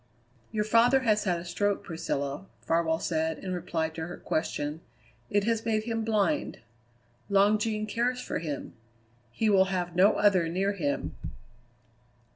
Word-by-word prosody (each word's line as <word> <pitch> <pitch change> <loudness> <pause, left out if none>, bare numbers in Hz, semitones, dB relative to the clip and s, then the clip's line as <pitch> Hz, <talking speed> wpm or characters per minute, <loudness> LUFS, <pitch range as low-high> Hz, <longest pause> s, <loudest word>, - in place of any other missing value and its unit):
"Your 215 -1 0
father 235 +5 +4
has 215 -4 +2
had 175 -3 +1
a 170 - -9
stroke, 200 +3 -1
Priscilla," 145 0 -3 0.2
Farwell 165 -1 +2
said 160 -1 -1
in 185 -1 -5
reply 170 -2 -2
to 160 0 -6
her 175 - -7
question; 150 -1 -2 0.5
"it 205 -1 +2
has 225 0 0
made 220 -2 0
him 225 0 -2
blind. 220 +7 0 0.7
Long 200 +2 +4
Jean 215 0 -1
cares 240 +4 -1
for 250 - -3
him. 150 -4 -5 0.6
He 220 - 0
will 195 -2 +5
have 180 -2 -3
no 190 +4 +6
other 190 -5 +3
near 195 +4 0
him." 140 - -2
195 Hz, 150 wpm, -28 LUFS, 165-215 Hz, 0.7 s, no